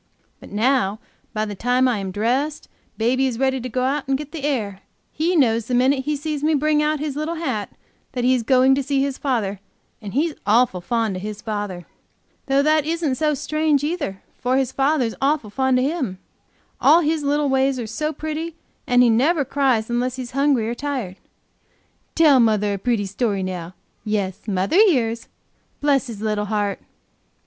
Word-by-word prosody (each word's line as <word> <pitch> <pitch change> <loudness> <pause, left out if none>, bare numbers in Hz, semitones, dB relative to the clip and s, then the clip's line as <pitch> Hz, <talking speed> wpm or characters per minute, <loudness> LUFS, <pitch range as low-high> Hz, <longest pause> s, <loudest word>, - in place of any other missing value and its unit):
But - - -13
now 215 -1 +1 0.3
by 215 0 -1
the 210 - -5
time 250 +5 +2
I 240 -4 0
am 195 -1 -4
dressed, 250 +10 -1 0.3
baby 255 +4 +2
is 245 -3 -3
ready 265 0 0
to 255 - -5
go 255 +2 -1
out 275 +2 -1
to 270 - +2
get 295 +1 -6
the 320 -4 -7
air; 210 -9 -2 0.3
he 335 +4 0
knows 230 -7 +2
the 250 - 0
minute 265 +2 +2
he 300 - 0
sees 295 0 -4
me 310 0 +3
bring 300 +1 +2
out 305 0 0
his 295 -2 -3
little 305 +3 -2
hat 260 -11 -3 0.4
that 250 -2 -2
he 255 +1 +4
is 255 - +1
going 260 +3 +4
to 275 - +1
see 275 0 0
his 275 -1 -3
father 215 -8 -1 0.4
and 205 0 -7
he's 310 +3 +1
awful 210 -3 +2
fond 225 -1 -1
of - - -6
his 210 +1 -6
father. 205 -5 -4 0.6
Though 275 +1 +3
that 310 0 +3
isn't 320 -2 -1
so 300 +2 +1
strange, 305 0 0
either, 295 - -3 0.2
for 255 +1 +1
his 265 -2 0
father's 270 -4 +1
awful 275 -6 0
fond 265 +1 +2
of 255 - +2
him. 275 - -2 0.6
All 335 +2 +6
his 315 0 0
little 290 +1 +1
ways 265 0 +2
are 240 - -3
so 300 +8 -2
pretty, 315 +1 -5 0.3
and 245 0 +5
he 240 - +5
never 285 +6 +2
cries 260 -5 +1
unless 245 +1 -1
he's 255 -2 -6
hungry 275 -4 +2
or 235 - -1
tired. 250 -9 -4 1.0
Tell 300 -5 +6
mother 210 -3 +2
a 200 - -4
pretty 225 -1 0
story 200 0 -1
now; 180 -1 -5 0.3
yes, 205 -2 -3
mother 195 - 0
hears, 245 - +3 0.5
bless 280 -2 +2
his 220 -4 -8
little 210 -1 0
heart!" 205 -1 -1
255 Hz, 190 wpm, -22 LUFS, 220-290 Hz, 1.0 s, All